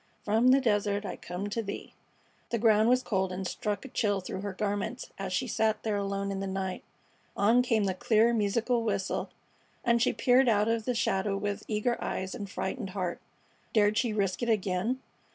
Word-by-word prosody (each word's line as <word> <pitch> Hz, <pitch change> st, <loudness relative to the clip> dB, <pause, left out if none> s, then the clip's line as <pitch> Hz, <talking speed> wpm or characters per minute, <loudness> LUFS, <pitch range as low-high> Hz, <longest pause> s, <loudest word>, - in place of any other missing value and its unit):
From 220 Hz, +4 st, +3 dB
the 260 Hz, +2 st, +7 dB
desert 205 Hz, -4 st, +1 dB
I 185 Hz, -, -4 dB
come 180 Hz, +3 st, -5 dB
to 230 Hz, -, -1 dB
thee! 200 Hz, -2 st, -7 dB, 0.6 s
The 235 Hz, -, 0 dB
ground 220 Hz, 0 st, +4 dB
was 255 Hz, +1 st, +3 dB
cold, 190 Hz, -2 st, 0 dB
and 185 Hz, +1 st, -4 dB
struck 210 Hz, +5 st, -3 dB
a -, -, -5 dB
chill 205 Hz, -5 st, 0 dB
through 185 Hz, 0 st, -5 dB
her 200 Hz, 0 st, -3 dB
garments 205 Hz, +4 st, -3 dB
as 195 Hz, -1 st, -3 dB
she 185 Hz, +8 st, 0 dB
sat 220 Hz, -2 st, 0 dB
there 215 Hz, -2 st, 0 dB
alone 200 Hz, 0 st, -2 dB
in 195 Hz, -, -3 dB
the 195 Hz, -, -3 dB
night. 190 Hz, -1 st, -3 dB, 0.5 s
On 225 Hz, +5 st, +5 dB
came 225 Hz, -4 st, +2 dB
the 190 Hz, -1 st, +1 dB
clear, 220 Hz, +4 st, +3 dB
musical 230 Hz, +3 st, +1 dB
whistle, 205 Hz, -4 st, -1 dB, 0.6 s
and 235 Hz, 0 st, +3 dB
she 245 Hz, -, +4 dB
peered 255 Hz, 0 st, +4 dB
out 210 Hz, -1 st, +3 dB
of 225 Hz, -1 st, 0 dB
the 250 Hz, -, 0 dB
shadow 195 Hz, -2 st, 0 dB
with 205 Hz, +1 st, -2 dB
eager 220 Hz, +3 st, -1 dB
eyes 190 Hz, 0 st, -3 dB
and 205 Hz, -5 st, -6 dB
frightened 190 Hz, +1 st, -3 dB
heart. 180 Hz, -2 st, -2 dB, 0.5 s
Dared 210 Hz, -1 st, +4 dB
she 235 Hz, 0 st, +1 dB
risk 200 Hz, -2 st, -1 dB
it 240 Hz, -, 0 dB
again? 210 Hz, +4 st, 0 dB
210 Hz, 195 wpm, -29 LUFS, 195-230 Hz, 0.6 s, the